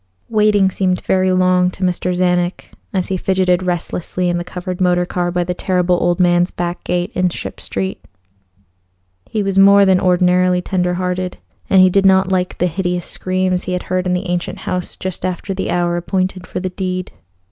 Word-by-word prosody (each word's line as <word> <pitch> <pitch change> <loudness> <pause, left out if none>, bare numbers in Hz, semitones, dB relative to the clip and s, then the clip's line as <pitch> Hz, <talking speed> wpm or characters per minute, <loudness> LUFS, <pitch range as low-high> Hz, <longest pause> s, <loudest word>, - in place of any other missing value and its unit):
Waiting 210 -3 +3
seemed 185 -1 0
very 185 0 +1
long 185 0 +3
to 185 - -7
Mr. 180 0 0
Czanek 180 0 0 0.2
as 190 -2 -2
he 190 - 0
fidgeted 185 -1 +1
restlessly 180 0 -2
in 175 0 0
the - - -3
covered 180 +1 -6
motor 180 -1 +2
car 175 0 -2
by 175 0 0
the 180 +1 -2
Terrible 180 0 +1
Old 175 0 +1
Man's 175 0 +3
back 175 0 -4
gate 175 0 -1
in 185 0 +1
Ship - - -7
Street. 190 0 -3 1.3
He 215 - -1
was 195 -1 +1
more 200 +1 +7
than 190 -1 +4
ordinarily 180 0 +3
tender 180 -1 -1
hearted, 180 0 -2 0.3
and 190 -1 +6
he 185 - +5
did 195 +1 +4
not 190 0 +4
like 180 -1 -1
the 180 - +1
hideous 180 0 -2
screams 185 -1 -1
he 185 - -3
had 180 - -2
heard 185 0 0
in 180 - +1
the 180 +2 -2
ancient 175 0 -2
house 180 -1 -4
just 185 -2 -5
after 185 +2 -3
the 190 - -3
hour 175 0 0
appointed 185 +1 -2
for - - -4
the 185 0 -3
deed. 185 -1 -4
180 Hz, 190 wpm, -17 LUFS, 180-185 Hz, 1.3 s, more